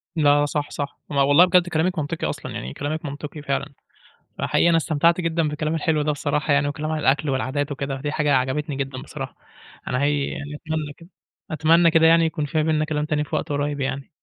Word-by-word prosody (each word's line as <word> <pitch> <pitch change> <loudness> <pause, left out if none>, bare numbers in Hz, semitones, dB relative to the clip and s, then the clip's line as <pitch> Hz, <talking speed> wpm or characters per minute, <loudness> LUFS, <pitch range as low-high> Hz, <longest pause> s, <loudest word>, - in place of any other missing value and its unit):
لا 145 -2 +4
صح، 145 0 -2
صح. 140 -1 -5
ما 140 -1 +1
والله 145 +6 +6
بجد 180 -1 +3
كلامك 160 +1 0
منطقي 155 +2 -2
أصلًا. - - -6
يعني 65 +2 -6
كلامك 155 +3 -4
منطقي 145 +1 -6
فعلًا. 140 0 -3 0.6
فحقيقي 170 - +2
أنا 165 - +4
استمتعت 165 +2 +2
جدًا 165 -1 0
بالكلام 155 +1 -2
الحلو 155 -1 +1
ده 150 0 +1
بصراحة 145 +1 0
يعني 145 0 +2
وكلام 150 +2 -3
عن 155 - -1
الأكل 145 +1 +2
والعادات 140 +2 -1
وكده. 135 -1 -4
دي 145 0 -2
حاجة 150 -2 +1
عجبتني 135 +3 -1
جدًا 135 -1 -4
بصراحة. - - -7 0.5
أنا 125 - 0
حقيقي 145 0 +1
يعني 145 +1 -6
أتمنى 155 -1 -4
كده 165 +2 -15 0.4
أتمنى 165 +2 +4
كده 160 0 +4
يعني 165 0 +5
يكون 155 -2 -2
في 155 - -4
ما 155 - +3
بيننا 155 -1 +1
كلام 150 -1 -1
تاني 150 -1 0
في - - -4
وقت - - -2
قُريّب 145 0 -1
يعني. 135 0 -3
150 Hz, 210 wpm, -23 LUFS, 145-160 Hz, 0.6 s, والله